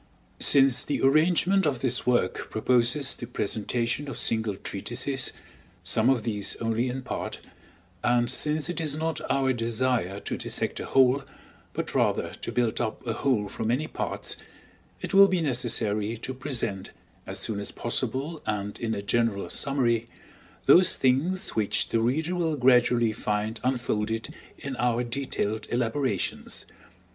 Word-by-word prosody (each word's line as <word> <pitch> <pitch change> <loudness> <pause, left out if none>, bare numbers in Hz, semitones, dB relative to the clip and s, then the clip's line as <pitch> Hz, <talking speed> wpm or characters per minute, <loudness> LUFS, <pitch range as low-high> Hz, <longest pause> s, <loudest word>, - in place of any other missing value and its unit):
Since 135 -2 +5
the 145 - -1
arrangement 170 +6 +4
of 135 -4 -1
this 125 -2 0
work 125 -1 +1
proposes 125 +4 +1
the 120 - -7
presentation 120 +5 -2
of 135 - -6
single 110 -3 0
treatises, 125 +8 -3 0.5
some 110 +6 +2
of 130 -4 +2
these 105 -3 -1
only 115 +2 0
in 130 +1 -4
part, - - -4 0.7
and 120 0 +3
since 150 +5 0
it 175 -1 -3
is 150 -3 -1
not 160 +1 -2
our 135 -1 +2
desire 115 -4 0
to - - -4
dissect - - -3
a - - -5
whole, 135 +1 +4 0.5
but - - -3
rather - - +1
to - - -5
build 120 -2 0
up 110 0 -3
a 115 - -1
whole 115 -4 +1
from 110 +2 -4
many 125 +7 +1
parts, - - -3 0.7
it - - -4
will 195 0 +9
be 185 -2 +1
necessary 115 -6 0
to 130 +4 -5
present, 120 -8 -3 0.4
as - - -4
soon 105 -2 -2
as 100 - -4
possible 130 +6 -2
and 105 -1 -2
in 115 -1 -1
a 100 - -4
general 115 -2 0
summary, 120 -5 0 0.6
those 185 +1 +6
thing's 140 +9 +1
which 105 -2 0
the 115 - +2
reader 155 +9 0
will 165 -3 0
gradually 125 -3 +4
find 105 +1 -2
unfolded 115 -1 -1 0.2
in 140 -2 -5
our 120 0 +1
detailed 115 -4 -2
elaborations. 120 -3 -1
125 Hz, 150 wpm, -27 LUFS, 110-140 Hz, 0.7 s, will